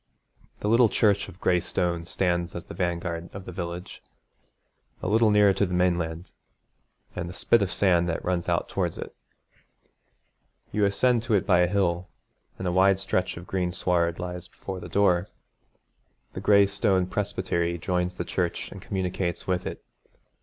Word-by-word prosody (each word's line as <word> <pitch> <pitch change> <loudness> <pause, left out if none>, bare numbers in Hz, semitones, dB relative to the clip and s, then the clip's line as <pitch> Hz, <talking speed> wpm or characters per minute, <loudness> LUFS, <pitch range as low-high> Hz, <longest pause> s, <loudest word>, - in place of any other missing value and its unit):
The - - -1
little 115 +1 +5
church 100 -2 +2
of 90 - -14
gray 90 -1 +3
stone 85 -1 -1
stands 85 -1 -1
as 85 - -5
the - - -9
vanguard 85 -1 -2
of 95 -1 -7
the - - -7
village, 85 0 -6 1.0
a - - -4
little 110 +3 +4
nearer 105 -1 +5
to 100 - +1
the 90 - -2
mainland, 85 -1 0 0.8
and 85 - -4
the 90 - -9
spit 115 - +3
of 95 -1 0
sand 90 -3 +2
that 80 - -3
runs 90 -2 -1
out - - +1
towards - - -2
it. - - -7 1.6
You 105 0 +2
ascend 120 +4 +2
to 115 -3 +2
it 100 - +1
by 90 -4 +4
a 90 - +4
hill, 90 -2 0 0.5
and 95 - -3
a - - +1
wide 95 +1 +4
stretch 95 -2 -1
of 85 - -8
green 90 -1 -1
sward 85 -2 0
lies 90 0 -6
before 95 0 -7
the - - -9
door. 90 -3 +3 1.1
The 95 - -5
gray 100 0 +6
stone 100 -2 +1
presbytery 85 -3 -1
joins 90 +1 -1
the 90 - -4
church 85 -1 -2
and 95 - -9
communicates 95 -2 -2
with 90 -1 -1
it. - - -7
90 Hz, 170 wpm, -26 LUFS, 85-100 Hz, 1.6 s, gray